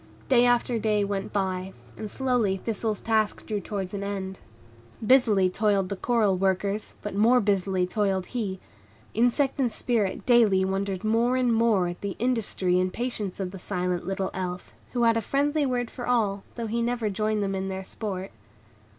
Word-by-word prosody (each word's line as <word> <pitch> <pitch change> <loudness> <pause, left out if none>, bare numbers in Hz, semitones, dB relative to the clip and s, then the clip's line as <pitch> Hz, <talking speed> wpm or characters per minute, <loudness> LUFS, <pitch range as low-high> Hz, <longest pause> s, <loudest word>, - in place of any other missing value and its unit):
Day 245 -2 +5
after 245 -1 +2
day 210 -1 +1
went 200 -1 -3
by, 190 -1 -2 0.2
and 215 - -6
slowly 245 -6 +1
Thistle's 215 +1 -2
task 220 -2 0
drew 210 -2 -2
towards 195 -1 -5
an 200 - -3
end. 190 -1 -4 0.7
Busily 215 -6 +5
toiled 195 0 +1
the 200 - -2
coral 215 -1 +2
workers, 195 +2 -1
but 210 - -4
more 230 +5 +5
busily 195 -3 +1
toiled 190 -1 0
he; 200 -6 -3 0.5
insect 245 +5 +2
and 250 -4 +2
Spirit 215 -6 -1
daily 215 -6 +5
wondered 195 0 -2
more 230 +3 +2
and 250 -2 +2
more, 225 -5 +3
at 175 0 -6
the 200 -2 -3
industry 215 -7 +1
and 185 0 0
patience 220 -6 -3
of 185 -2 -3
the 190 - -8
silent 180 -1 -2
little 195 0 -2
Elf, 180 -1 -5 0.2
who 240 -1 +1
had 230 0 +4
a - - +1
friendly 285 +5 +1
word 245 -2 -1
for 245 - -6
all, 210 -5 +1
though 235 - -3
he 230 +2 -1
never 235 -2 0
joined 215 +1 0
them 195 0 -1
in 190 0 -2
their 190 0 -4
sport. 190 -1 -5
205 Hz, 175 wpm, -26 LUFS, 190-235 Hz, 0.7 s, Day